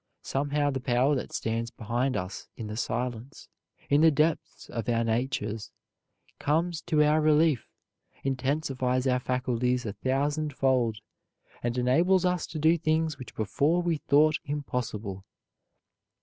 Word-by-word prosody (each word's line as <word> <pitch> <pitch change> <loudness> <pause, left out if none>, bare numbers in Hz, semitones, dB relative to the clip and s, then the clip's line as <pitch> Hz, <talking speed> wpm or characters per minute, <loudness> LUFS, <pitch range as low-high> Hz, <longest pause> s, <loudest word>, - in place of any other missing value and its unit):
Somehow 145 +1 0
the 135 - -2
power 125 +3 +2
that 130 - -3
stands 115 +1 -2
behind 120 +4 -1
us 90 +2 -5
in 115 - -5
the 105 0 -5
silence, 120 +2 -4 0.4
in 145 +1 +4
the 165 - +7
depths 155 +1 0
of 115 0 -4
our 115 -1 +2
natures, 115 -2 -2 0.7
comes 165 +3 0
to 155 -3 +4
our 150 +1 +3
relief, 155 -4 +3 0.6
intensifies 130 -1 0
our 125 -1 +2
faculties 125 -1 0
a 105 - -3
thousandfold 130 -1 0 0.6
and 120 +1 -2
enables 170 +10 +3
us 180 -2 0
to 160 - -6
do 160 +2 +3
things 155 -1 0
which 130 - -10
before 150 +10 +1
we 170 -2 +1
thought 150 +2 +3
impossible. 120 -9 -4
135 Hz, 135 wpm, -28 LUFS, 120-155 Hz, 0.7 s, the